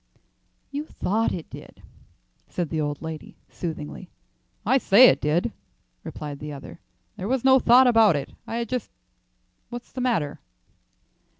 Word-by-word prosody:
"You 285 +1 -3
thought 220 +4 0
it 170 - -5
did," - - -12 0.7
said 175 -4 -3
the 155 - 0
old 145 +1 -3
lady 160 -1 -7 0.2
soothingly. 170 +1 -6 0.6
"I 265 - +4
say 245 +3 +7
it - - +1
did," 150 -4 0 0.5
replied 145 -2 -7
the 150 0 -6
other. 135 -2 -10 0.4
"There 190 - -4
was 260 +1 0
no 265 0 +7
thought 250 +2 +6
about 225 -7 +5
it; 140 - -4 0.2
I 225 - -4
had 235 0 -2
just 250 +1 -3 0.8
What's 240 0 -8
the 255 - -5
matter?" 220 - 0
195 Hz, 145 wpm, -25 LUFS, 150-245 Hz, 0.8 s, say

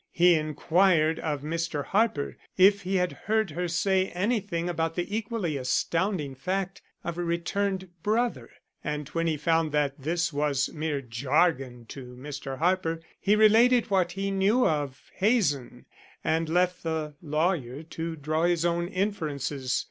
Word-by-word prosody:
He 175 +1 +5
inquired 160 +1 +2
of 145 -3 -3
Mr. 155 -2 -2
Harper 205 -8 +1 0.2
if 195 +2 +6
he 190 +1 -2
had 180 -1 +1
heard 220 -3 -1
her 175 +4 -2
say 190 +2 +1
anything 190 -3 -1
about 165 -1 -1
the 185 +4 -2
equally 210 -8 -2
astounding 160 +4 0
fact 185 +7 -3 0.2
of 170 0 -4
a - - 0
returned 190 +3 -1
brother, 230 +5 0 0.3
and 150 -2 -3
when 165 +1 -1
he 155 -2 0
found 160 +1 +1
that 145 -1 0
this 165 +3 -1
was 145 -2 0
mere 150 -2 -2
jargon 125 0 0
to 125 -2 -9
Mr. 135 0 -6
Harper, 165 0 +1 0.2
he 205 +1 +3
related 225 +2 +5
what 190 -3 +2
he 195 +1 -2
knew 200 +6 +3
of 145 -4 -3
Hazen 185 - +1 0.4
and 160 0 0
left 180 +1 +1
the 160 -2 -3
lawyer 150 -3 -1
to 165 0 -5
draw 155 +2 0
his 175 -1 +1
own 170 0 +1
inferences. 150 -9 -2
165 Hz, 150 wpm, -27 LUFS, 150-190 Hz, 0.4 s, if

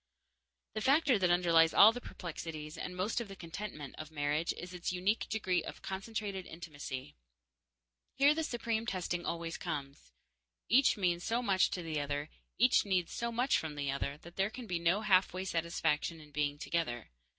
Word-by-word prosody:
The 215 - -3
factor 270 -2 +4
that 180 -2 +3
underlies 170 -2 +4
all 210 +2 +10
the 245 +2 -6
perplexities, 155 -5 -6
and 180 - -5
most 205 +6 0
of 235 - -6
the 195 - -9
contentment, 165 -4 -7
of 155 -1 -6
marriage 150 +1 0
is 180 +1 -7
its 180 0 -3
unique 185 +5 0
degree 185 -6 0
of - - -8
concentrated 195 -1 -4
intimacy. 145 - -7 1.0
Here 280 +2 +6
the 320 +1 -1
supreme 230 -4 -2
testing 180 -2 -2
always 170 -1 -3
comes. 145 -5 -5 0.6
Each 260 +1 +5
means 175 -3 +1
so 235 +2 0
much 195 -4 +3
to 180 - -4
the 160 -2 -2
other, 145 +1 -3 0.3
each 250 +2 +5
needs 185 -4 0
so 235 0 -2
much 245 +4 +2
from 155 -2 -5
the 140 -1 -1
other, 140 +1 -3
that 170 +1 -13
there 195 +1 +2
can 245 +2 -8
be 180 -5 -2
no 175 +5 +2
halfway 190 -2 +3
satisfaction 165 -2 0
in 150 -1 -14
being 145 0 -1
together. 135 - -2
175 Hz, 175 wpm, -33 LUFS, 155-210 Hz, 1.0 s, all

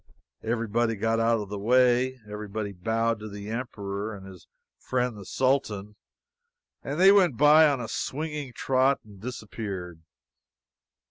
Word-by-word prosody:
Everybody 115 0 0
got 115 +2 0
out 115 -1 +2
of 100 - -7
the 105 0 -5
way; 125 +3 +3
everybody 105 0 -5
bowed 115 +4 -1
to 105 0 -7
the 100 +1 -7
Emperor 105 -3 -4
and 95 -1 -11
his 95 -3 -13 0.3
friend 125 -2 -1
the 100 -2 -10
Sultan; 105 -6 -1 0.9
and 145 +4 -4
they 190 +2 +8
went 185 - +4
by 150 +2 +7
on 140 -3 +1
a 115 - -4
swinging 150 0 -4
trot 130 +2 +2
and 100 -3 -16
disappeared. 100 -7 -6
115 Hz, 140 wpm, -27 LUFS, 105-130 Hz, 0.9 s, they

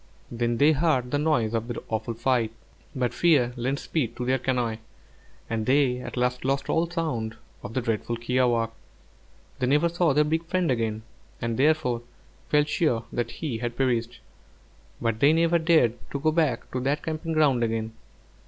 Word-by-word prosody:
Then 120 0 -1
they 145 +5 +5
heard 145 -5 +1
the 145 - +1
noise 125 -8 +1
of 115 0 -1
the 120 - -4
awful 110 +1 -3
fight; 115 -1 +1 0.5
but 125 -2 0
fear 140 -8 +3
lent 130 +3 -1
speed 130 -7 -2
to 125 - -4
their 130 +1 +1
canoe, 120 -3 -1 0.7
and 110 -1 -2
they 130 -2 +3
at 125 0 -7
last 125 0 0
lost 135 +1 0
all 165 +1 +1
sound 130 -11 -2 0.3
of 110 - -8
the 130 - +1
dreadful 115 0 -2
kiawākq'. 120 -1 +1 0.9
They 125 - +1
never 150 +5 +3
saw 170 -1 +2
their 150 +2 +4
big 160 +2 0
friend 175 -3 0
again, 110 -3 -1 0.4
and 115 -1 -2
therefore 135 -3 +2 0.5
felt 150 0 +3
sure 150 -8 +1
that 120 -1 -1
he 125 -4 -4
had 120 0 -4
perished; 120 -3 0 0.8
but 115 -1 -1
they 145 +5 +5
never 170 +1 +3
dared 160 -8 +4 0.2
to 140 - -3
go 155 +2 +2
back 155 -7 0
to 130 - -2
that 140 +4 -1
camping 160 0 -3
ground 145 -6 +3
again. 110 -1 -2
125 Hz, 175 wpm, -26 LUFS, 115-150 Hz, 0.9 s, they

